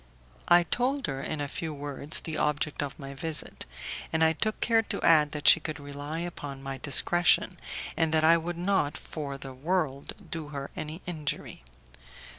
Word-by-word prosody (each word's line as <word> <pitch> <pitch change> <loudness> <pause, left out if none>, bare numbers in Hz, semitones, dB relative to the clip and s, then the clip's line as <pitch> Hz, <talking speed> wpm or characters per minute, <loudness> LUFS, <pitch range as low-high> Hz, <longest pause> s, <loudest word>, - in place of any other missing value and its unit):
I 175 0 +7
told 255 - 0
her 135 -2 -3
in 155 +2 -3
a 145 - -1
few 155 +2 -4
words 145 +1 -2
the 160 - -4
object 150 0 0
of 145 +2 -4
my 140 -3 -8
visit, 155 +2 -3 0.4
and 160 0 +2
I 160 0 +5
took 215 +6 -1
care 225 -1 +3
to 225 - -4
add 150 -3 +6
that 150 -1 -2
she - - +10
could 155 -1 -5
rely 145 +3 -5
upon 145 -6 -6
my 135 -1 -5
discretion, 175 +5 +3 0.4
and 165 -1 +1
that 160 -1 +3
I 165 +1 +7
would 170 +1 -2
not 175 -5 +1
for 140 -3 -6
the 135 -1 -8
world 145 -1 -1 0.2
do 160 -3 -4
her 140 -2 -6
any 155 +1 -6
injury. 155 - -3
155 Hz, 180 wpm, -28 LUFS, 145-170 Hz, 0.4 s, she